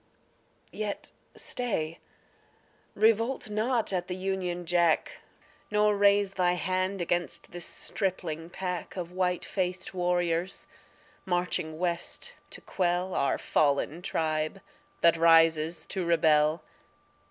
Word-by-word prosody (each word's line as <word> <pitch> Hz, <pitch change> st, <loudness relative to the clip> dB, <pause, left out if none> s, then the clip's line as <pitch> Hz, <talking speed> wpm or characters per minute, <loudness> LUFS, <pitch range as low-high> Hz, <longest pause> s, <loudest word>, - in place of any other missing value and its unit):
Yet 210 Hz, -1 st, -4 dB, 0.2 s
stay. 165 Hz, -10 st, -3 dB, 1.0 s
Revolt 225 Hz, +2 st, +2 dB
not 220 Hz, 0 st, +1 dB
at 180 Hz, -1 st, -1 dB
the 180 Hz, -, -3 dB
Union 185 Hz, -2 st, -2 dB
Jack, 170 Hz, -1 st, +2 dB, 0.5 s
Nor 210 Hz, 0 st, +3 dB
raise 200 Hz, -1 st, +4 dB
Thy 180 Hz, -2 st, +2 dB
hand 185 Hz, +1 st, -1 dB
against 175 Hz, 0 st, -2 dB
this 175 Hz, 0 st, -4 dB
stripling 175 Hz, -5 st, -3 dB
pack 180 Hz, 0 st, -4 dB
Of 175 Hz, -1 st, -4 dB
white 180 Hz, -1 st, 0 dB
faced 185 Hz, 0 st, -2 dB
warriors, 175 Hz, 0 st, 0 dB, 0.6 s
marching 175 Hz, -3 st, -1 dB
West 175 Hz, -, -2 dB, 0.2 s
to -, -, -8 dB
quell 180 Hz, 0 st, -1 dB
Our 140 Hz, -, +1 dB
fallen 150 Hz, +3 st, +1 dB
tribe 155 Hz, 0 st, -1 dB, 0.4 s
that 170 Hz, 0 st, +5 dB
rises 165 Hz, 0 st, +4 dB
to 190 Hz, -, -3 dB
rebel. 155 Hz, -2 st, +3 dB
180 Hz, 105 wpm, -29 LUFS, 165-190 Hz, 1.0 s, that